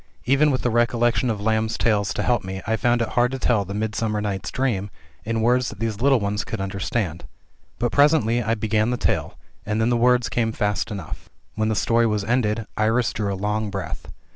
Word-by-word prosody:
Even 140 +4 +4
with 130 -2 -1
the 120 - +1
recollection 120 +2 +2
of 110 -3 -1
Lamb's 110 +1 0
tales 105 -3 +1
to - - -1
help 120 -4 +1
me 95 +1 -5
I 110 - +1
found 120 +2 +2
it - - -4
hard 125 +1 +2
to - - -2
tell 110 -6 +1
the 100 +2 -6
"Midsummer 110 0 -1
Night's 100 -2 -3
Dream" 115 -7 -1 0.4
in 115 0 -1
words 125 +1 +2
that 110 - -10
these 110 -2 -3
little 135 -1 +4
ones 105 0 -1
could 115 - -5
understand. 95 -2 -3 0.5
But 120 0 -1
presently 140 -5 +3
I 115 0 0
began 110 +1 0
the 125 - 0
tale, - - -1 0.3
and 105 +1 -2
then 110 +2 +2
the - - +3
words 125 0 +3
came 115 -1 -1
fast 105 +1 -1
enough. 100 -7 -7 0.2
When 110 0 0
the 110 - 0
story 115 +3 +2
was 105 -2 0
ended, 115 -1 0
Iris 110 +2 +1
drew 105 -2 -2
a 95 - -3
long 105 +2 -1
breath. 90 -7 -6
110 Hz, 215 wpm, -23 LUFS, 105-120 Hz, 0.5 s, Even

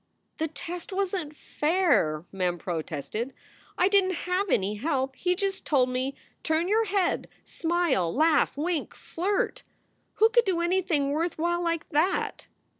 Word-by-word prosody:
"The 320 - +1
test 335 +5 -7
wasn 380 -4 -1
t 300 - -18
fair!" 295 - +1
Mem 180 -2 -1
protested. 170 - -4 0.4
"I 360 - +4
didn 395 -1 +4
t 370 - -1
have 365 +3 -1
any 195 -5 +1
help. 265 +1 -1
He 360 +4 0
just 390 +1 -2
told 260 -4 +2
me, 255 +2 -2 0.3
Turn 320 +2 +1
your 440 +3 +3
head, 390 -3 0 0.2
smile, 325 - 0
laugh, 310 - +3
wink, 320 +1 -2
flirt. 385 +4 -2 0.5
Who 445 +1 +5
could 470 +1 +4
do 365 -3 +1
anything 340 -5 +1
worth 330 +3 -1
while 345 +2 0
like 335 -1 -1
that 320 +6 0
330 Hz, 150 wpm, -27 LUFS, 270-370 Hz, 0.5 s, Who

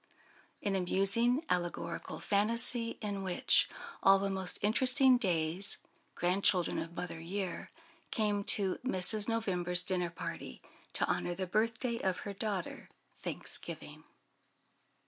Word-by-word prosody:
An 200 -1 -1
amusing 195 - +2
allegorical 175 -5 -3
fantasy. 230 +3 +2 1.0
All 195 0 +6
the 195 0 -2
most 190 -1 -1
interesting 255 +4 +4
Days, 175 -1 0 0.4
grandchildren 180 0 +1
of 165 +1 -7
Mother 175 -2 -6
Year, 180 +2 -5 0.4
came 205 -2 -1
to 195 -3 +2
Mrs. 210 -1 +3
November's 180 -6 +4
dinner 180 -2 -1
party, 170 - -7 0.3
to - - 0
honour 175 - -2
the 190 +1 -3
birthday 230 +5 -1
of 185 -1 -2
her 200 - -6
daughter, 200 -3 -5 0.3
Thanksgiving. - - -1
195 Hz, 105 wpm, -32 LUFS, 180-225 Hz, 1.0 s, All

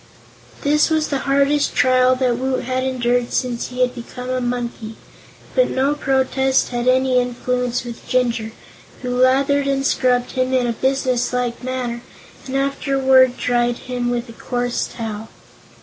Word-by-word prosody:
This 300 +2 +3
was 315 -1 +1
the 275 - -1
hardest 280 +1 +2
trial 255 0 +4
that 250 -2 0
Woot 260 0 -1
had 255 +1 -1
endured 245 -2 0
since 245 -2 -1
he 250 0 +1
became 250 0 -7
a 255 0 -1
monkey, 240 -2 -4 0.6
but - - +3
no 270 +2 +1
protest 265 -1 +1
had 240 0 -2
any 255 0 +3
influence 250 0 -1
with 235 -1 -9
Jinjur, 235 -3 0 0.5
who 250 0 -2
lathered 275 +2 +3
and 275 0 0
scrubbed 250 -2 +1
him 255 0 0
in 250 -1 +2
a 235 - 0
business 255 0 0
like 245 -1 -2
manner 250 -2 -3 0.5
and 265 - -4
afterward 265 -2 +3
dried 240 -1 +1
him 250 -1 -3
with 240 0 -2
a 230 - -11
coarse 245 +1 -2
towel. 220 -2 -6
255 Hz, 150 wpm, -20 LUFS, 245-265 Hz, 0.6 s, trial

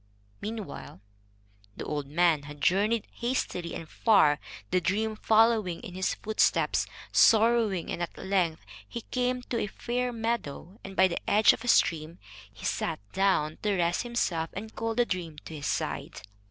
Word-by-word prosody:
Meanwhile, 215 - -6 0.8
the - - -5
old 145 -2 -3
man 165 0 +3
had 145 0 -10
journeyed 205 +8 +2
hastily 235 -8 -2
and 165 - -7
far, 175 -8 +4 0.3
the 185 0 +2
dream 215 +5 0
following 220 -5 +3
in 220 -7 -9
his 185 +1 -1
footsteps, 215 0 +1 0.2
sorrowing; 225 -5 +4
and - - -4
at 175 - -4
length 180 -5 0 0.2
he 235 - -5
came 250 +1 -1
to 240 -1 -2
a 210 - -1
fair 245 +4 -2
meadow, 225 -5 -4
and 195 0 -8
by 190 - +6
the 175 - -3
edge 210 +1 +6
of - - -7
a - - -6
stream 165 -6 +2 0.3
he - - -11
sat - - -1
down 190 -6 +1
to 205 -2 +1
rest 175 0 +1
himself, 185 -9 -1
and 220 +3 -7
called 225 0 -3
the 240 - +4
dream 170 -7 -4
to - - -8
his 145 -2 -5
side. - - -3
195 Hz, 165 wpm, -28 LUFS, 170-225 Hz, 0.8 s, by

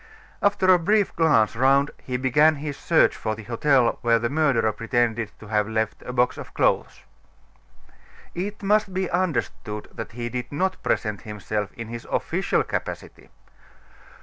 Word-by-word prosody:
After 200 -2 +2
a 180 - +4
brief 205 +4 +1
glance 145 -11 +3
round, 135 +3 +3
he 125 -1 -3
began 145 +5 +4
his 145 0 -5
search 165 +3 +3
for 110 -1 -3
the 110 - -10
hotel 120 +2 +2
where 115 -1 +3
the 120 +2 -2
murderer 140 -8 +2
pretended 115 -1 -1
to 105 - -13
have 105 0 +1
left 110 0 -2
a - - -6
box 125 0 +1
of - - -10
clothes. - - +1 1.3
It 200 +4 -5
must 200 -1 +2
be 190 -1 -1
understood 150 - -2
that 115 - -7
he 120 0 -4
did 125 +1 -5
not 185 +6 -1
present 105 -2 -1
himself 105 -1 -4
in 115 -1 -8
his 115 0 -7
official - - 0
capacity. - - -6
125 Hz, 155 wpm, -24 LUFS, 110-160 Hz, 1.3 s, a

